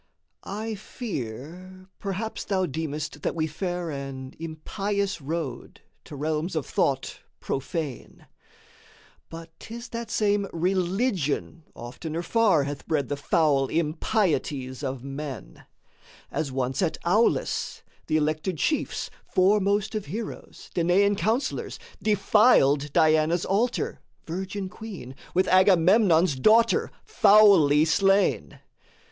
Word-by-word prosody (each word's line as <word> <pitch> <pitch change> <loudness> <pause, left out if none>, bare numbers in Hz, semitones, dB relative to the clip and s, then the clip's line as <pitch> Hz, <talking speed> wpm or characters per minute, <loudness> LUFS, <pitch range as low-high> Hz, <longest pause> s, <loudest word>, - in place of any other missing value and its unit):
I 220 +3 -4
fear 185 - -7
perhaps 205 +3 -4
thou 190 -2 0
deemest 155 -1 -4
that - - -2
we 160 -1 0
fare 175 +1 -3
An 135 -2 -6
impious 195 +4 -3
road 145 -3 -5 0.2
to 150 - -9
realms 155 +4 -2
of 155 - -1
thought 135 -1 -1 0.2
profane; 140 - -5 1.0
But 165 0 -9
'tis 235 +1 -9
that 235 -1 -5
same 205 -2 +1
religion 180 - -1
oftener 155 +8 -6
far 200 -8 +3
Hath 140 0 -6
bred 145 -6 0
the 145 - -1
foul 140 -2 +2
impieties 155 - -1
of 130 -3 -4
men: 135 - -7 0.7
As 145 -4 -2
once 130 +2 -1
at 170 -4 0
Aulis, 210 +7 +1 0.2
the 155 - +2
elected 155 +3 -1
chiefs, 305 - -1 0.2
Foremost 200 +2 +2
of 215 -2 -4
heroes, 215 +8 -7
Danaan 185 +4 +3
counsellors, 225 +7 -1 0.2
Defiled 195 - +4
Diana's 160 +1 +3
altar, 225 +6 0 0.3
virgin 190 +3 -4
queen, 185 - -9 0.2
With 185 - +3
Agamemnon's 185 -2 +5
daughter, 225 - +4 0.2
foully 200 - +6
slain. 195 +4 +2
170 Hz, 105 wpm, -26 LUFS, 150-200 Hz, 1.0 s, foully